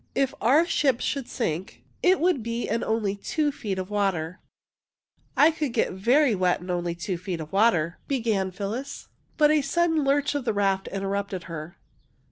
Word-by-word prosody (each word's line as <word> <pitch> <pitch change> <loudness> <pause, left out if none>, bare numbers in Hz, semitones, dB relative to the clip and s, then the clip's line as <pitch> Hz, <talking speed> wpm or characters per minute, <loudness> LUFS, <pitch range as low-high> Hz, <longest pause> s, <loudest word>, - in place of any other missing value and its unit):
If 270 -1 +1
our 280 +9 +5
ship 275 -7 +1
should 275 -4 -2
sink, 180 -6 -4 0.2
it 370 +1 +4
would 345 -6 +2
be 230 +1 -3
in 230 +2 -1
only 220 -3 0
two 295 +8 -1
feet 210 -9 -4
of 185 +2 -5
water." 185 -5 -1 0.9
^' - - -39
1 315 +2 +7
could 300 -6 -2
get 225 - +1
very 245 +8 +3
wet 180 -2 +1
in 180 +1 -6
only 175 -1 -2
two 175 +1 -4
feet 180 -2 -4
of 155 +1 -8
water," 190 -6 +2
began 225 -8 0
Phyllis, 215 +9 -5 0.3
but 300 -1 +5
a 305 -1 +4
sudden 320 +2 +1
lurch 280 +1 +2
of 285 -2 -2
the 230 -3 0
raft 195 -1 +1
interrupted 195 -1 -3
her. 165 0 -8
215 Hz, 180 wpm, -26 LUFS, 185-280 Hz, 0.9 s, 1